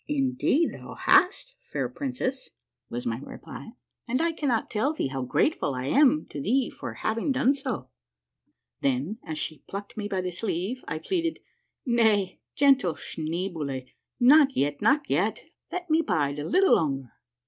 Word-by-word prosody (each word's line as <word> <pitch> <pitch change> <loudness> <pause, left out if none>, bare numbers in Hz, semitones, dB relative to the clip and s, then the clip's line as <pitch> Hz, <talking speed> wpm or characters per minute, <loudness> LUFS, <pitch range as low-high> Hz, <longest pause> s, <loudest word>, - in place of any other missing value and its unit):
" - - -47 0.2
Indeed 265 +5 +1
thou - - -9
hast, 390 +7 +3 0.2
fair - - -1
princess," 265 -1 -3 0.4
was 120 +1 -4
my 115 0 -1
reply; 225 - -10 0.2
" - - -54
and 255 +2 +1
I 335 +1 +2
cannot 275 -8 0
tell 250 +8 +1
thee 225 - -2
how 135 0 -3
grateful 140 - +1
I 125 0 -3
am 250 - +4
to 145 - -5
thee 250 - +1
for - - -7
liaving 230 +5 -1
done 265 +1 +3
so." 255 - -4 0.9
Then, 140 - 0
as 155 -2 -5
she 155 0 -4
plucked 200 +2 -7
me 210 -1 -2
by 190 -2 -1
the 180 0 -3
sleeve, 195 +6 -3
I - - -2
pleaded, 335 - -1 0.5
"Nay, 220 -6 +2 0.2
gentle 270 - +4
Schneeboule, 160 -5 -4 0.3
not 275 +2 +6
yet, 145 +1 0
not 285 +2 +3
yet, 200 +10 0 0.3
let 360 -1 -4
me 320 0 +3
bide 150 - 0
a 145 - -4
bit 375 +3 +4
longer. 135 - +2
220 Hz, 165 wpm, -27 LUFS, -, 0.9 s, not